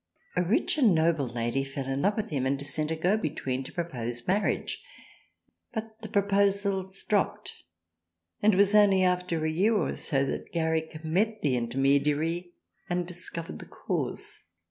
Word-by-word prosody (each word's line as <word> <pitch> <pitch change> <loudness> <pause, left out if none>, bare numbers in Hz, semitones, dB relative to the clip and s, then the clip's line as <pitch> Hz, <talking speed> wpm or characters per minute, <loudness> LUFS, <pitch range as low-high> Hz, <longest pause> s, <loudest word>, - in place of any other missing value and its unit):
A - - +3
rich 200 - +1
and 220 - +5
noble 160 -4 +2
Lady 120 +3 -1
fell 135 0 -5
in 135 +1 -2
love 200 +5 +2
with 215 -4 -3
him 135 -3 0
and 135 +1 0
sent 150 +1 -1
a 160 - 0
go 180 +6 +2
between 135 -7 -2
to - - -9
pro 170 - -1
pose 120 -6 -4
marriage, 200 +3 0 0.9
but 220 0 -6
the 215 - -7
proposals 200 -1 +1
dropped 205 -2 0 0.9
and 210 -1 +5
it - - 0
was 200 +1 +5
only 200 -3 +6
after 180 -3 +1
a 160 - +1
year 200 +8 +2
or - - 0
two 135 -1 0
that 135 - -4
Garrick 160 -1 -1
met 210 +7 0
the 140 -4 +2
inter 120 +1 -2
mediary 150 +6 +1 0.4
and 175 0 0
discovered 170 - -6
the - - -10
cause. - - -4
170 Hz, 170 wpm, -28 LUFS, 140-200 Hz, 0.9 s, only